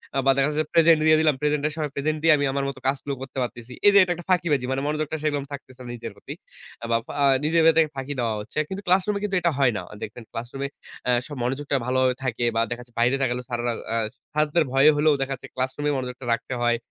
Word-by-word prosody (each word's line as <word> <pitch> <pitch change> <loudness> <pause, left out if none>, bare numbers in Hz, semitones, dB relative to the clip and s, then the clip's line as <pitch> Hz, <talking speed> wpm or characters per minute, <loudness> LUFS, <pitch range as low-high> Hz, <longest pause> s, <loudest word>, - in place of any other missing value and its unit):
আ - - 0
বা 135 - +6
দেখা 140 0 +2
যাচ্ছে 150 +1 -2
যে - - -13
প্রেজেন্ট 165 -1 +6
দিয়ে 155 0 +6
দিলাম। 155 -3 +3
প্রেজেন্ট 150 -1 +1
এর 155 - -4
সময় 150 -3 -3
প্রেজেন্ট 155 +2 -1
দিয়ে 165 - +7
আমি 145 - 0
আমার 140 0 -1
মত 135 - -7
কাজগুলো 140 0 -1
করতে 135 0 -8
পারতেছি। 120 0 -7
এই 205 - +9
যে - - +7
এটা 180 - -2
একটা 175 - -10
ফাঁকিবাজি। 155 -8 +2
মানে 135 +1 -1
মনোযোগটা 155 +1 -2
সেরকম 145 -2 0
থাকতেছে 130 -2 -9
না 120 - -8
নিজের 115 -1 -7
প্রতি। - - -9 0.5
আ - - -3
বা 115 - +4
ফা - - -7 0.3
নিজের 165 +2 +3
ভেতরে 165 0 +6
ফাঁকি 135 +2 -4
দেওয়া 115 -2 0
হচ্ছে। 120 +8 -5
কিন্তু 190 +1 -5
ক্লাসরুমে 195 +3 +2
কিন্তু 195 -2 -1
এটা 170 -1 +2
হয় 135 -3 +4
না। - - -3
অ - - -10
দেখবেন 115 +3 -7
ক্লাসরুমে 130 +4 -5 0.4
অ্যা 125 - +3
সব 145 - -7
মনোযোগটা 140 +3 -1
ভালোভাবে 130 0 +2
থাকে 120 -1 -1
বা 115 - +3
দেখা 120 0 -4
যাচ্ছে 120 -1 -17
বাইরে 125 +3 +3
তাকালেও 125 -1 -1
স্যারেরা, 120 0 -1 0.2
আ - - 0 0.4
স্যারদের 150 +2 +2
ভয়ে 135 +3 +6
হলেও 150 +1 +4
দেখা 135 0 -1
যাচ্ছে - - -12
ক্লাসরুমে 130 +3 -1
মনোযোগটা 125 0 -5
রাখতে 115 - -4
হয়। 120 0 +2
140 Hz, 245 wpm, -24 LUFS, 125-155 Hz, 0.5 s, এই